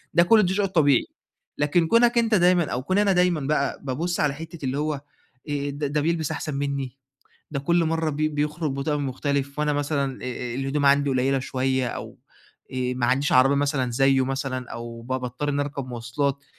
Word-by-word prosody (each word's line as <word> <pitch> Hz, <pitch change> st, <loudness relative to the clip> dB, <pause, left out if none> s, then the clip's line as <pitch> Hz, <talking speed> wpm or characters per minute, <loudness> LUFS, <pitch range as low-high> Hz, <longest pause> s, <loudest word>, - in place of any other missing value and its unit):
ده 170 Hz, -, +7 dB
كل 210 Hz, 0 st, +5 dB
شئ 200 Hz, +1 st, +1 dB
طبيعي. 145 Hz, -8 st, +3 dB, 0.5 s
لكن 160 Hz, +3 st, +2 dB
كونك 235 Hz, +3 st, +4 dB
أنت 230 Hz, -2 st, +3 dB
دايمًا 180 Hz, -2 st, +4 dB
أو 125 Hz, +1 st, -2 dB
كوني 185 Hz, +6 st, +2 dB
أنا 200 Hz, -1 st, +3 dB
دايمًا 180 Hz, -3 st, +2 dB
بقى 140 Hz, 0 st, 0 dB
بابص 160 Hz, +7 st, -2 dB
على 145 Hz, -2 st, +2 dB
حتّة 165 Hz, -1 st, -8 dB
اللي 130 Hz, +2 st, -1 dB
هو 155 Hz, 0 st, -1 dB, 0.5 s
آآ 145 Hz, -1 st, -1 dB
ده 145 Hz, +1 st, -1 dB
بيلبس 160 Hz, -1 st, 0 dB
أحسن 150 Hz, -, -4 dB
مني، 140 Hz, -2 st, -3 dB, 0.5 s
ده 140 Hz, -2 st, -2 dB
كل 170 Hz, +4 st, +2 dB
مرة 160 Hz, 0 st, 0 dB
بي 155 Hz, +1 st, 0 dB
بيخرج 150 Hz, +1 st, -2 dB
بطقم 140 Hz, +1 st, -1 dB
مختلف، 140 Hz, +2 st, -2 dB
وأنا 150 Hz, 0 st, +1 dB
مثلًا 140 Hz, -2 st, -1 dB
آآ 125 Hz, -1 st, -4 dB
الهدوم 135 Hz, +2 st, 0 dB
عندي 140 Hz, 0 st, +4 dB
قليلة 135 Hz, +1 st, +1 dB
شوية 130 Hz, 0 st, -1 dB
أو -, -, -7 dB, 0.5 s
آآ -, -, -5 dB, 0.2 s
ما 125 Hz, -1 st, 0 dB
عنديش 135 Hz, +3 st, +1 dB
عربية 130 Hz, +2 st, +5 dB
مثلًا 140 Hz, -3 st, 0 dB
زيّه 135 Hz, +1 st, +3 dB
مثلًا 135 Hz, -2 st, -3 dB
أو 115 Hz, 0 st, -7 dB
با 130 Hz, +2 st, -2 dB
باضطر 125 Hz, +3 st, -4 dB
إني 145 Hz, 0 st, +1 dB
أركب 140 Hz, -2 st, -5 dB
مواصلات، 130 Hz, +4 st, -2 dB
140 Hz, 185 wpm, -24 LUFS, 130-155 Hz, 0.5 s, ده